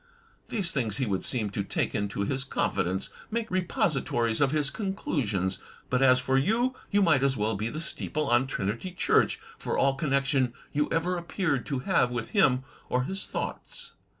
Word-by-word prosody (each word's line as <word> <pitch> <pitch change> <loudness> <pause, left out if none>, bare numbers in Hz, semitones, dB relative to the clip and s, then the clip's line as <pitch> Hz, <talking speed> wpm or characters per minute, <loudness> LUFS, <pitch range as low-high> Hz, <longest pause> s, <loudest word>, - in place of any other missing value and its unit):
These 195 -7 -1
things 115 -8 -1
he 130 - 0
would 100 -4 -1
seem 110 -5 -1
to 100 - -2
take - - -1
into 100 -1 -2
his 130 +6 0
confidence, 95 -7 -1 0.2
make 230 0 -2
the 185 0 +2
reposi 175 - 0
tories 115 0 +1
of 140 - +5
his 145 -1 +2
conclusions; 120 - -1 0.3
but 125 0 +2
as 130 -1 +6
for 130 +1 +2
you 235 - +2
— - - -28
^you 205 -1 +4
might 155 -7 +4
as 135 -1 +2
well 110 +1 0
be 105 +3 -2
the 155 - -5
steeple 155 -2 -3
on 120 +2 +3
Trinity 115 - -3
Church, - - +2 0.2
for - - -2
all 135 0 +4
connection 135 -3 +1 0.2
you 150 +1 +1
ever 175 +2 +1
appeared 170 -5 -1
to 135 -3 -2
have 170 -10 +3
with 120 -2 -4
him 130 -11 +4 0.3
or 125 0 +1
his 190 +8 -4
thoughts. 470 -2 -5
135 Hz, 190 wpm, -28 LUFS, 120-170 Hz, 0.3 s, as